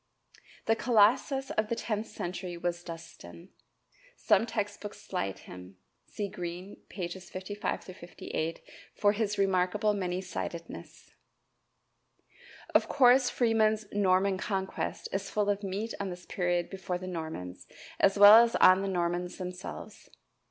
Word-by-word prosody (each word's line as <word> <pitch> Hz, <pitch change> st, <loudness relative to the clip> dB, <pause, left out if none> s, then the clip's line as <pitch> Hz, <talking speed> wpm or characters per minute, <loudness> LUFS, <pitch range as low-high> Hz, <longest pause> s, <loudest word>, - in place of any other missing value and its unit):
The 225 Hz, -, +3 dB
colossus 245 Hz, +4 st, +3 dB
of 215 Hz, 0 st, 0 dB
the 235 Hz, -, 0 dB
tenth 220 Hz, -1 st, -3 dB
century 175 Hz, 0 st, -5 dB
was 175 Hz, 0 st, -3 dB
Dunstan. 165 Hz, -, -11 dB, 0.7 s
Some -, -, +2 dB
text -, -, -3 dB
books -, -, -8 dB
slight 95 Hz, 0 st, -4 dB
him. 90 Hz, +1 st, -11 dB, 0.3 s
See 205 Hz, -2 st, -4 dB
Green, 180 Hz, +1 st, -7 dB
pp. 180 Hz, 0 st, -5 dB
55 205 Hz, +3 st, -4 dB
58 170 Hz, -2 st, -5 dB, 0.3 s
for 205 Hz, -, +3 dB
his 210 Hz, -1 st, -1 dB
remarkable 195 Hz, +2 st, +2 dB
many 185 Hz, -3 st, -2 dB
sidedness. 170 Hz, -2 st, -7 dB, 1.6 s
Of -, -, +4 dB
course 255 Hz, -1 st, +5 dB
Freeman's 220 Hz, -2 st, +2 dB
"Norman 190 Hz, -1 st, +2 dB
Conquest" 190 Hz, -1 st, -3 dB
is 195 Hz, 0 st, -2 dB
full 205 Hz, -1 st, +1 dB
of 200 Hz, 0 st, -3 dB
meat 200 Hz, +3 st, -4 dB
on 200 Hz, -, -3 dB
this 180 Hz, 0 st, -8 dB
period 175 Hz, -1 st, -1 dB
before 185 Hz, -2 st, -3 dB
the 185 Hz, -, -8 dB
Normans, 160 Hz, -, -6 dB, 0.3 s
as 195 Hz, +1 st, +4 dB
well 205 Hz, +3 st, +10 dB
as 235 Hz, 0 st, -1 dB
on 185 Hz, +1 st, +6 dB
the 195 Hz, -, -2 dB
Normans 175 Hz, -1 st, -2 dB
themselves. 180 Hz, 0 st, -8 dB
190 Hz, 130 wpm, -30 LUFS, 175-210 Hz, 1.6 s, well